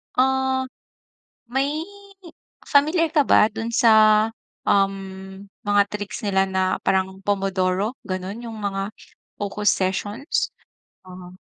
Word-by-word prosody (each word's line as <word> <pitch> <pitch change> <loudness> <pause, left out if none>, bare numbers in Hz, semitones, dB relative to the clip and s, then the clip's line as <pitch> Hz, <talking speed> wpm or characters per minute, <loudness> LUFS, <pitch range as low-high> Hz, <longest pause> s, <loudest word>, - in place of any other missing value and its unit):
Ah, 265 0 +1 0.8
may 275 +5 -1 0.9
familiar 315 +3 +2
ka 305 - +5
ba 265 - +5
doon 225 +1 -4
sa, 215 -2 +5 0.4
um, 195 0 -1 0.2
mga 205 0 +3
tricks, 205 +2 -6
nila 190 -1 +1
na 185 0 0
parang 190 0 0
pomodoro, 195 +1 0 0.2
gano'n, 185 +4 -4
yung 225 - -8
mga 200 -1 -3 0.5
focus 205 0 0
sessions? 205 - -1 0.5
Ah. 180 -1 -12
205 Hz, 105 wpm, -23 LUFS, 190-235 Hz, 0.9 s, ka